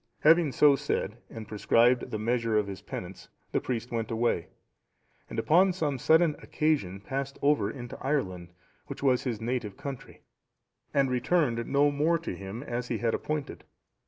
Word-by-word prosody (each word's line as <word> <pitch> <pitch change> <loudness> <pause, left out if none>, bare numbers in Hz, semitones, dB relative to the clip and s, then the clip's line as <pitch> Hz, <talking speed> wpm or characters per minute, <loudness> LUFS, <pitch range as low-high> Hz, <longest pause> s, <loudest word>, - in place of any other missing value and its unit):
Having 160 -2 +5
so 145 -2 +6
said, 130 -6 -2
and 110 -2 -8
prescribed 115 +3 +3
the 110 - -3
measure 115 0 0
of 105 - +2
his 100 -2 -7
penance, - - -8 0.2
the - - 0
priest 120 -1 -3
went 115 -2 -2
away, 115 -6 0 0.8
and - - -7
upon 185 +4 +4
some 150 -7 -2
sudden 160 +2 +4
occasion 140 - -1
passed 135 +6 -4
over 145 +1 +3
into 120 -3 -8
Ireland, 95 - -2 0.4
which - - -7
was 130 -2 +2
his 120 -5 -2
native 115 -3 -3
country, 140 -3 -8 0.7
and 135 -2 +2
returned 125 -2 +1
no 145 +1 +3
more 155 +4 +2
to 165 - -5
him, 100 +6 -7
as 125 -2 -4
he 120 - -1
had 115 0 0
appointed. 150 -2 -3
125 Hz, 160 wpm, -28 LUFS, 115-145 Hz, 0.8 s, so